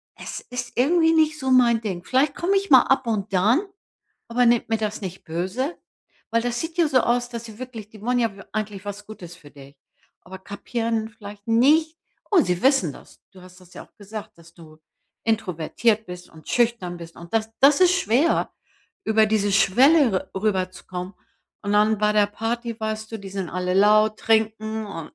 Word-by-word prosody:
es - - -7
ist 245 -1 -6
irgendwie 325 +5 +3
nicht 310 -1 +2
so 265 -2 -2
mein 240 -3 +5
Ding. 190 -5 -4
Vielleicht 275 +6 +1
komme 375 +4 0
ich 395 0 -2
mal 260 -3 +8
ab 265 -2 +1
und 210 -4 -2
dann, 215 - +3 0.7
aber 245 +1 +2
nehmt 235 0 +3
mir 225 - +1
das 215 0 -3
nicht 185 -1 -7
böse.“ 190 - -3 0.5
Weil 230 +1 +2
das 240 0 -2
sieht 325 +1 -6
ja 335 -3 +4
so 260 -3 +3
aus, 240 +1 0
dass 235 -1 -6
sie 220 -2 -12
wirklich 230 -5 -8
die 215 - -14
wollen 245 +2 0
ja 230 -3 0 0.2
eigentlich 210 -2 -4
was 205 0 -7
Gutes 175 -6 -10
für 150 -3 -16
dich. 140 0 -15 0.5
Aber 190 +1 -10
kapieren 225 +3 -3
vielleicht 205 -1 -12
nicht 305 +8 +3 0.4
oh, 380 - +6
sie 180 -5 -2
wissen 260 - +3
das. - - -16
Du 185 -2 -15
hast 185 0 -16
das 180 -1 -18
ja - - -9
auch - - -38
gesagt, 210 -2 -9
dass 165 0 -18
du 155 -2 -16 0.5
introvertiert 220 +1 0
bist 180 0 -10
und 160 -1 -16
schüchtern 230 -7 0
bist 170 0 -11
und 170 +4 -11
das 220 0 0
das 280 +3 +5
ist 365 -1 +6
schwer, 295 - +1 0.5
über 220 0 +3
diese 210 -2 +1
Schwelle 235 - +4
r 190 - -3
rüberzukommen. 185 -2 -3 0.5
Und 205 -1 -2
dann 210 +1 +3
bei 210 0 +2
der 210 -1 +4
Party, 230 +2 -4
weißt 220 0 -4
du, 225 - -4
die 195 -1 -9
sind 190 -2 -4
alle 180 0 -2
laut, 215 +2 +4
trinken 220 0 0
und, 165 -6 -8
220 Hz, 195 wpm, -23 LUFS, 190-245 Hz, 0.7 s, mal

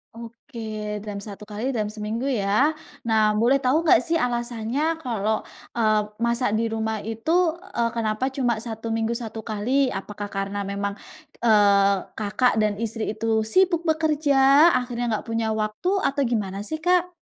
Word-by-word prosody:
Oke 225 -3 -6
dalam 200 -1 -5
1 205 0 -9
kali 215 +5 -4
dalam 220 -5 -1
seminggu 220 +4 -3
ya. 250 +4 +2 0.3
Nah, 220 -2 +3
boleh 260 +5 +3
tahu 300 +7 +2
nggak 250 -6 +6
sih 330 +3 0
alasannya 245 +5 -1
kalau, 220 -6 -2 0.3
eee, 215 -2 +3 0.2
masak 235 -2 +1
di 230 - 0
rumah 220 -1 -2
itu, 225 +6 -5 0.5
eee, 235 0 +2
kenapa 220 +1 -1
cuma 245 -5 0
1 225 0 -6
minggu 225 +1 0
1 225 -2 -6
kali 250 +5 0
apakah 205 +1 -5
karena 195 0 -3
memang, 200 0 -3 0.5
eee, 200 -2 +5 0.2
Kakak 220 +3 +1
dan 215 -1 +2
istri 225 -1 -2
itu 220 0 0
sibuk 350 +5 +2
bekerja 300 -1 +4
akhirnya 240 -2 -3
nggak 215 - -3
punya 225 -1 0
waktu 215 +10 -2
atau 280 +1 0
gimana 205 -4 -2
sih, 315 +4 -4
Kak? 360 +1 +2
225 Hz, 155 wpm, -24 LUFS, 215-260 Hz, 0.5 s, nggak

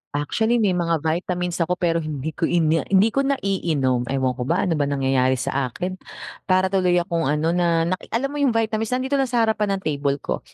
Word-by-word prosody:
Actually 220 +11 0
may 215 -5 +2
mga 170 -3 0
vitamins 175 +2 -2
ako 175 +2 +1
pero 170 -2 0
hindi 155 -1 -4
ko 165 +2 -1
ina 165 -2 +1
hindi 200 +3 +4
ko 275 0 0
naiinom. 160 - 0
Ewan 130 -1 0
ko - - -1
ba, 170 - +1
ano 165 -5 0
bang 140 0 0
nangyayari 130 -1 +2
sa 130 +2 -1
akin. 185 +9 -5 0.5
Para 185 0 +2
tuloy 180 -2 +2
akong 170 -3 0
ano, 150 +3 +1
na 170 -2 +2
naki 185 +3 -3
alam 275 +4 -1
mo 295 - -4
yung 270 -5 +2
vitamins 220 0 0
nandito 265 +2 -1
lang 270 - +1
sa 240 -2 +1
harapan 215 -2 +1
ng 195 - -6
table 140 -2 0
ko. - - -2
175 Hz, 210 wpm, -22 LUFS, 150-200 Hz, 0.5 s, hindi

